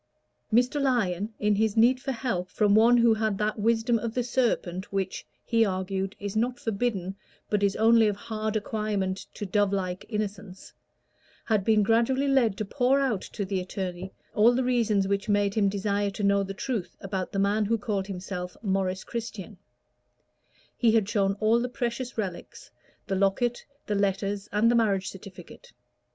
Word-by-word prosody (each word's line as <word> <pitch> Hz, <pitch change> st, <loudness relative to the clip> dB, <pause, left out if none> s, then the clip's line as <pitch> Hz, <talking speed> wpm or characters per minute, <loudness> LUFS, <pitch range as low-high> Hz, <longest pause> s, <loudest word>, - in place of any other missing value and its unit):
Mr. 250 Hz, +5 st, +2 dB
Lyon, 215 Hz, -7 st, 0 dB
in 210 Hz, 0 st, +2 dB
his 215 Hz, +1 st, +1 dB
need 245 Hz, +3 st, +5 dB
for 270 Hz, 0 st, -2 dB
help 230 Hz, -8 st, -2 dB
from 210 Hz, -2 st, +2 dB
one 230 Hz, +3 st, +6 dB
who 235 Hz, -1 st, +5 dB
had 220 Hz, -2 st, -1 dB
that 210 Hz, +1 st, -1 dB
wisdom 230 Hz, +2 st, +2 dB
of 230 Hz, 0 st, -4 dB
the 250 Hz, -, +1 dB
serpent 230 Hz, -7 st, -1 dB
which, 195 Hz, -1 st, -3 dB, 0.2 s
he 230 Hz, -1 st, +3 dB
argued, 190 Hz, 0 st, -2 dB
is 205 Hz, 0 st, -5 dB
not 240 Hz, +3 st, 0 dB
forbidden, 200 Hz, -4 st, -2 dB, 0.4 s
but 210 Hz, -1 st, +2 dB
is 200 Hz, -1 st, +2 dB
only 225 Hz, 0 st, +5 dB
of 205 Hz, -, 0 dB
hard 215 Hz, +1 st, -4 dB
acquirement 205 Hz, -3 st, -2 dB
to 205 Hz, -, -5 dB
dovelike 195 Hz, -2 st, 0 dB
innocence, 205 Hz, -3 st, -5 dB, 0.7 s
had 215 Hz, -4 st, +1 dB
been 215 Hz, 0 st, +3 dB
gradually 235 Hz, +6 st, +2 dB
led 245 Hz, -8 st, +2 dB
to 215 Hz, -, -2 dB
pour 260 Hz, +5 st, +2 dB
out 250 Hz, -9 st, 0 dB
to 200 Hz, -, -5 dB
the 190 Hz, 0 st, -1 dB
attorney 185 Hz, 0 st, -5 dB, 0.2 s
all 225 Hz, +3 st, +5 dB
the 260 Hz, -, +1 dB
reasons 225 Hz, -6 st, +1 dB
which 200 Hz, +1 st, -1 dB
made 205 Hz, -1 st, +2 dB
him 205 Hz, -2 st, +2 dB
desire 200 Hz, +1 st, -1 dB
to 200 Hz, +1 st, -6 dB
know 200 Hz, 0 st, +3 dB
the 195 Hz, 0 st, -4 dB
truth 220 Hz, -3 st, -4 dB
about 190 Hz, -1 st, -4 dB
the -, -, -4 dB
man 205 Hz, +2 st, +2 dB
who 230 Hz, +3 st, +1 dB
called 205 Hz, -3 st, -2 dB
himself 180 Hz, -2 st, -6 dB
Maurice 190 Hz, -2 st, -1 dB
Christian: 220 Hz, -3 st, -6 dB, 1.2 s
he 230 Hz, -3 st, +3 dB
had 220 Hz, -4 st, +3 dB
shown 195 Hz, -2 st, +1 dB
all 225 Hz, +2 st, +3 dB
the 250 Hz, +1 st, -2 dB
precious 245 Hz, -1 st, -4 dB
relics, 190 Hz, -5 st, -6 dB, 0.3 s
the 195 Hz, -, -3 dB
locket, 200 Hz, +5 st, +1 dB, 0.2 s
the 210 Hz, -, -2 dB
letters, 200 Hz, 0 st, -1 dB
and 215 Hz, +3 st, +3 dB
the -, -, +2 dB
marriage 200 Hz, -5 st, +1 dB
certificate. 195 Hz, -, -12 dB
210 Hz, 170 wpm, -27 LUFS, 195-230 Hz, 1.2 s, one